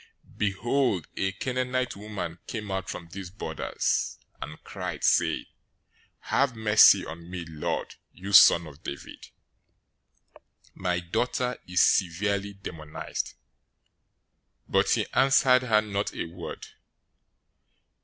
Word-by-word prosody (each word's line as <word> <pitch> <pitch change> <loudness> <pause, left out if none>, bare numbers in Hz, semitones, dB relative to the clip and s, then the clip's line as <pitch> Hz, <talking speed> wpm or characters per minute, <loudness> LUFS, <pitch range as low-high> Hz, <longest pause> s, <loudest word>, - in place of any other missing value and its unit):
015:022 - - -21
Behold, 105 - 0
a 95 - 0
Canaanite 125 +4 -2
woman 100 -5 -6
came 105 -3 -5
out 95 0 -3
from 85 - -6
those 95 +1 -7
borders, 95 - -2 0.2
and - - -8
cried, - - -6
saying, - - +2 0.8
"Have 135 -3 +1
mercy 110 -1 +6
on 85 +2 -9
me, 90 -2 -5
Lord, 80 -2 -3 0.2
you 100 +2 -8
son 85 -2 +8
of 75 -2 -13
David! 70 - -8 1.5
My 90 -1 -1
daughter 125 +7 -1
is 90 0 +3
severely 100 +2 +1
demonized!" 80 -6 -6 1.3
015:023 - - -22
But - - +3
he - - +2
answered 130 -1 +5
her 105 -2 +4
not 100 -1 -3
a - - -3
word. 85 +1 -8
100 Hz, 115 wpm, -27 LUFS, 85-110 Hz, 1.5 s, son